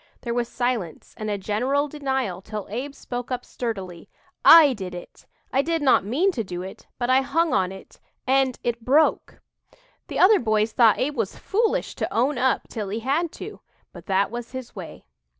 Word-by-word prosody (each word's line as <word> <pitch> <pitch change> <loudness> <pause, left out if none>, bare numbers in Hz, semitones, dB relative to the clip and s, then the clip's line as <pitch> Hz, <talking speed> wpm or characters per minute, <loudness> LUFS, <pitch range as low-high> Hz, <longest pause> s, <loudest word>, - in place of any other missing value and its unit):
There 235 - -3
was 240 -1 -1
silence 240 -9 -3
and 215 -1 -5
a 205 - -1
general 250 +9 0
denial 265 -10 -2
till 210 0 -6
Abe 270 +6 -4
spoke 245 -2 -6
up 250 -1 -3
sturdily: 190 -8 -6 0.3
"I 310 -5 +9
did 190 -5 -6
it. 175 - -11 0.3
I 270 - +4
did 330 +1 -1
not 265 - +4
mean 290 - +1
to 240 -10 -3
do 180 -2 -6
it, 190 - -10
but 245 0 0
I 260 +1 +5
hung 320 +4 +1
on 185 -1 +1
it 190 - -13 0.3
and 265 -1 +2
it 235 -1 -2
broke!" 290 +6 +2 0.6
The - - -5
other 405 +3 +6
boys 215 -1 +1
thought 225 -2 +5
Abe 290 +3 -1
was 225 -6 -2
foolish 450 +3 0
to - - -2
"own 250 +3 +1
up" 260 +1 +1
till 210 -4 -5
he 220 +3 -3
had 300 +7 0
to - - -8 0.3
but - - -12
that 195 +1 +1
was 240 +1 -7
his 260 -2 -7
way. 185 -5 -9
245 Hz, 190 wpm, -24 LUFS, 210-275 Hz, 0.6 s, I